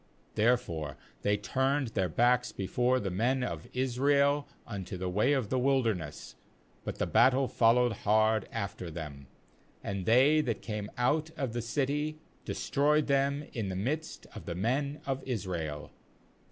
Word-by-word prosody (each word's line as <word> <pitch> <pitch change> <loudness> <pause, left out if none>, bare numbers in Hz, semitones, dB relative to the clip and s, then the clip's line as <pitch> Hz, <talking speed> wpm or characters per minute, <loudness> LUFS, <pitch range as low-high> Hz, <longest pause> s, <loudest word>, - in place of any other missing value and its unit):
^Therefore 105 - +1 0.3
they 105 0 +2
turned 135 +5 0
then 95 -4 0
backs 125 +7 +2
before 125 +6 +1
the 100 -5 -3
men 125 +7 +1
of 85 -8 -4
Israel 140 +3 +2 0.2
unto 95 -4 -6
the 90 0 -3
way 105 +9 +2
of 130 -7 0
the 130 - +1
wilderness; 115 - 0 0.5
but - - -5
the - - 0
battle 130 +1 +4
followed 120 +1 +4
hard 110 0 +2
after 100 -5 -4
them; 75 -4 -7 0.6
and 100 -2 -4
they 135 +7 +5
that 120 -6 -3
came 105 -2 -4
out 150 +6 +1
of 130 -5 -2
the 120 - -2
city 145 +5 -1 0.3
destroyed 150 +2 +1
them 140 +1 +1
in 110 -5 -2
the 95 - -3
midst 145 +12 -3
of - - -10
the 85 - -3
men 140 - -1
of 135 -1 -2
Israel. 85 - -4
120 Hz, 150 wpm, -30 LUFS, 100-135 Hz, 0.6 s, they